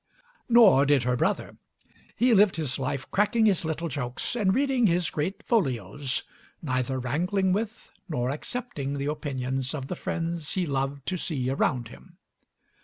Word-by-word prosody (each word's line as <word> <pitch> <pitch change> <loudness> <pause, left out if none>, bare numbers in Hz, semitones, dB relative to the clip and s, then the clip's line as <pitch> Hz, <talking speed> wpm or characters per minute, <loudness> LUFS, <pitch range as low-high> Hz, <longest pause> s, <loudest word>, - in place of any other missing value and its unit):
Nor 220 - +7
did 140 -3 +4
her 125 0 +1
brother. - - -1 0.6
He 240 +2 +3
lived 205 -2 +5
his 150 -6 -2
life 135 0 -2
cracking 220 +3 +3
his 195 -5 +3
little 160 +1 -2
jokes 130 - -3
and 205 -5 +2
reading 265 -3 +3
his 175 -1 +1
great 190 +8 -3
folios, 135 - 0 0.4
neither 130 -3 -1
wrangling 180 - 0
with 220 +2 -4 0.2
nor 125 -5 -1
accepting 145 - -4
the 140 - -2
opinions 135 -3 -2
of 135 -2 -6
the - - -2
friends 165 -2 -3
he 185 -2 +1
loved 140 -1 -2
to 185 - -2
see 135 -7 -2
around 125 -3 0
him. 175 +7 -15
150 Hz, 155 wpm, -27 LUFS, 130-190 Hz, 0.6 s, Nor